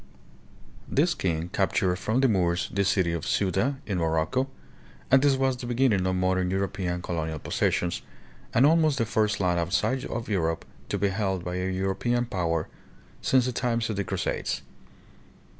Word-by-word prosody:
This 165 +5 +2
king 85 - -2
captured 95 -1 +1
from 110 +7 0
the 135 - +5
Moors 90 -5 +1
the 100 - +2
city 95 -3 +2
of 85 - -3
Ceuta, 120 +8 +1
in 95 -4 -1
Morocco; 80 +11 0 0.6
and 130 0 +7
this 140 -1 +4
was 130 -1 +1
the 120 -1 -6
beginning 120 -6 +2
of 95 - +1
modern 95 0 +1
European 90 -2 -2
colonial 80 -3 -2
possessions, 85 +3 0 0.5
and 125 - +5
almost 155 -2 +4
the 115 - +1
first 110 -1 +1
land 90 -2 +2
outside 100 +10 0
of 115 0 -4
Europe 80 -5 -1 0.2
to 100 - 0
be 100 +1 +1
held 95 -2 -1
by 90 0 -3
a 90 +1 -1
European 95 +6 0
power 85 -7 -1 0.5
since 130 -2 +3
the 125 - 0
times 115 -2 -1
of - - -3
the 100 - -1
Crusades. - - -2
95 Hz, 165 wpm, -27 LUFS, 90-120 Hz, 0.6 s, and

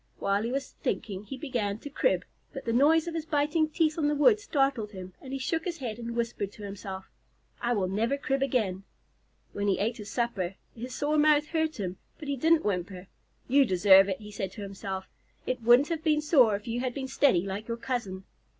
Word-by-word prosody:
While 200 +1 +1
he 230 +2 -2
was 275 +1 -3
thinking 200 -2 -3
he 270 - -7
began 235 -8 -2
to 290 - -9
crib, - - +1 0.3
but 270 - -7
the 230 - 0
noise 310 +6 +4
of 340 - -3
his 325 -1 -4
biting 310 +1 +1
teeth 310 0 +1
on 295 - +2
the 295 - +1
wood 420 +9 +5
startled 270 - 0
him, 185 -1 -8
and 265 - -9
he 270 - -2
shook 320 +5 -1
his 345 -2 -3
head 240 -5 -5
and 235 0 -5
whispered 230 -4 -2
to 210 - -11
himself, 195 -1 -7 0.5
"I 240 0 +1
will 195 -5 0
never 225 +8 0
crib 270 -1 -1
again." 220 -9 0 0.7
When 205 0 -2
he 195 - +2
ate 225 +4 -1
his 210 -2 -8
supper, 200 -7 -2 0.2
his 245 +2 -6
sore 300 +1 +1
mouth 300 0 +4
hurt 315 -5 -1
him, 185 -2 -3 0.2
but 300 - -9
he 280 - 0
didn't 320 +4 +3
whimper. 185 -1 -3 0.4
"You 275 +2 +5
deserve 195 -2 +6
it," 190 - -2
he 210 -1 -10
said 195 -3 -4
to 210 - -7
himself. 195 -1 -5 0.4
"It 255 -1 -2
wouldn't 240 +5 +5
have 325 -2 -2
been 305 -2 +2
sore 270 -9 +5
if 205 +4 -7
you 235 +1 -2
had 250 -1 -2
been 270 -2 -3
steady 260 -9 +3
like 200 +2 -5
your 230 0 -3
cousin." 230 -7 -3
240 Hz, 220 wpm, -28 LUFS, 200-290 Hz, 0.7 s, deserve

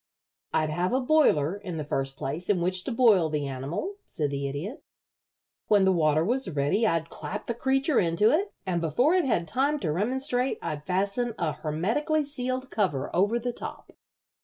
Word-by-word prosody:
"I'd 155 -1 +1
have 175 +7 0
a 260 - +3
boiler, 250 - +3
in 185 -5 -6
the 155 - -2
first 135 -2 -3
place, 155 +8 -4
in 200 -3 +3
which 180 +1 0
to - - -2
boil 220 -9 +4
the 150 -2 -1
animal," 140 - -4
said 150 -2 -2
the 140 0 -2
Idiot. 165 - -5 0.8
"When 205 -2 +4
the 190 - +4
water 155 -2 +2
was 250 +2 0
ready 150 +9 +1
I'd 165 -3 -1
clap 210 +2 -6
the 235 - -2
creature 270 +4 +1
into 175 +5 +3
it, 395 +7 +1
and 175 -3 -1
before 245 - +2
it 365 -4 +3
had 175 -10 0
time 280 - +1
to 165 -6 0
remonstrate 250 - 0
I'd 150 -2 -5
fasten 200 +6 0
a 165 -4 0
hermetically 225 - 0
sealed 255 -2 -3
cover 180 -11 -1
over 205 +6 +3
the 240 +1 -3
top." - - -8
190 Hz, 185 wpm, -27 LUFS, 155-250 Hz, 0.8 s, boil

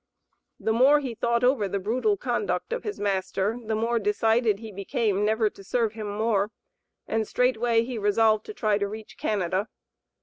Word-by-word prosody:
The 220 - 0
more 270 +6 +5
he 260 -5 -4
thought 235 +1 0
over 245 -5 +3
the 200 - -2
brutal 250 - 0
conduct 470 - -2
of 485 - -3
his 420 - -5
master 200 +2 -1
the 220 0 -2
more 230 +2 +1
decided 220 +1 +2
he 220 +1 -9
became 205 0 -1
never 220 +1 +2
to 195 - -14
serve 225 +2 0
him 215 -2 -5
more, 210 -1 0 0.6
and 220 -1 -1
straightway 240 -2 +2
he 240 -1 -4
resolved 215 +1 +2
to - - -6
try 215 - +1
to 200 - 0
reach 215 +1 -9
Canada. 195 0 -1
220 Hz, 175 wpm, -26 LUFS, 205-235 Hz, 0.6 s, more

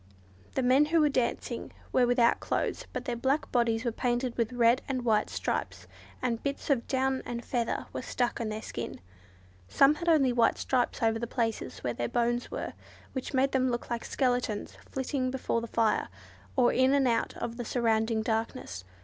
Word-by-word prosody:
The 265 - +1
men 260 +4 +5
who 325 +2 +2
were 300 -1 +4
dancing 255 -4 -2 0.2
were 250 -1 +4
without 240 -1 +4
clothes, - - -2
but 250 - -4
their 245 -3 -1
black 265 +5 0
bodies 235 -1 +1
were 235 - +1
painted 245 +1 -1
with 230 -1 0
red 240 +1 +4
and 255 -2 -2
white 215 -2 +2
stripes, - - -3 0.4
and 235 -2 0
bits 280 +1 -2
of 250 -4 +1
down 265 0 +1
and 235 0 -5
feathers 235 -3 -1
were - - -3
stuck 245 -1 -1
on 225 - -2
their 215 +1 -5
skin. 120 - -5 0.7
Some 275 - +5
had 340 +3 -2
only 275 -6 +4
white 235 -1 +3
stripes 250 -2 0
over 225 0 +2
the 235 - -3
places 230 -2 -2
where 120 - -1
their 120 0 -2
bones 240 0 0
were, - - -4 0.4
which 260 +1 -4
made 270 +1 +3
them 260 -1 +2
look 240 0 -3
like 235 -1 -2
skeletons 245 -5 -1
flitting 265 -1 -1
before 255 -3 -1
the 235 - -5
fire, 225 -2 +1 0.5
or 250 -2 +4
in 260 +2 +4
and 275 -2 +3
out 230 -1 0
of 235 0 -4
the 240 - -3
surrounding 225 -2 +1
darkness. 220 - -2
245 Hz, 190 wpm, -29 LUFS, 230-260 Hz, 0.7 s, men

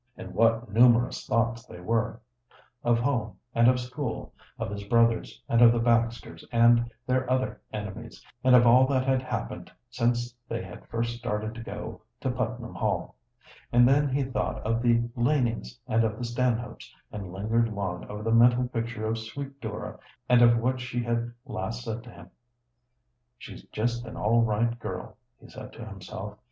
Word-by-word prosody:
And - - -8
what 115 -1 +2
numerous 120 +1 +4
thoughts 115 +1 +1
they 90 - -10
were 115 +5 -1 0.6
of 120 0 +3
home 120 -5 -1 0.2
and 115 0 +4
of 125 0 +4
school, 125 0 -5 0.2
of - - -4
his 100 0 -5
brothers, 115 +1 +1
and 115 - +3
of 120 -1 +9
the 120 - +1
Baxters 115 -6 0
and 120 0 +5 0.2
their 130 0 0
other 130 0 0
enemies, 105 +2 -7 0.2
and 130 0 +6
of 120 -1 +7
all 125 +2 +6
that 130 -2 +1
had 130 -1 +2
happened 130 - -5 0.2
since 120 0 0 0.2
they - - -3
had - - -11
first 115 0 -2
started 110 -2 -3
to 115 - -8
go 110 -1 -7 0.2
to 130 - -1
Putnam 125 -1 -3
Hall. - - -2 0.6
And 120 0 +6
then 145 +2 +4
he 135 +1 +1
thought 130 0 -2
of 115 +1 +1
the 120 -1 +3
Lanings 120 -1 0
and 115 +1 +2
of 110 -1 -1
the 120 - -4
Stanhopes, 120 -1 -2 0.2
and 100 -4 -6
lingered 110 +4 0
long 95 -4 -3
over 105 +1 -7
the 115 - 0
mental 120 +2 +5
picture 115 -2 -3
of 110 +1 -1
sweet 135 +5 -7
Dora 110 -2 -6 0.3
and 125 -1 +5
of 120 -1 +7
what 130 +3 0
she 120 0 -3
had 120 0 -1
last 115 +4 -4
said 115 0 -4
to - - -11
him. - - -13 1.1
"She's - - -10
just 120 +2 -2
an - - -8
all 115 +3 +3
right 115 +2 +1
girl," - - -6 0.2
he - - -15
said - - -10
to - - -9
himself. 105 +2 -8
115 Hz, 175 wpm, -27 LUFS, 115-125 Hz, 1.1 s, of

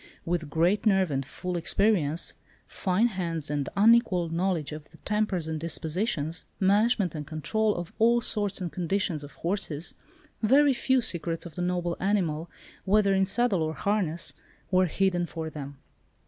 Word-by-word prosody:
With 165 -3 -2
great 175 +8 +2
nerve 190 -5 +3
and 135 0 -1
full 180 +6 -5
experience, 170 -3 +2 0.3
fine 190 +3 0
hands, 170 -8 -2
an 145 -2 -1
unequalled 205 -6 +4
knowledge 170 -3 -1
of 150 0 -8
the - - -18
tempers 210 -6 0
and 160 -1 -3
dispositions, 165 0 -2
management 200 -1 +3
and 150 -2 -6
control, 210 +7 0
of 175 0 -6
all 235 +2 +5
sorts 205 -4 0
and 175 -3 -3
conditions 175 -1 -1
of 145 -1 -11
horses, 170 -3 -3 0.5
very 275 +5 +5
few 260 +1 +2
secrets 170 -5 0
of 170 - -9
the 180 - -4
noble 175 -1 -1
animal, 175 -5 0 0.3
whether 200 0 +3
in 190 0 +3
saddle 215 -4 +1
or 155 0 -1
harness, 190 -5 -1 0.4
were 185 0 +4
hidden 175 0 0
from 160 -2 -5
them. 140 -2 -8
180 Hz, 155 wpm, -27 LUFS, 160-205 Hz, 0.5 s, all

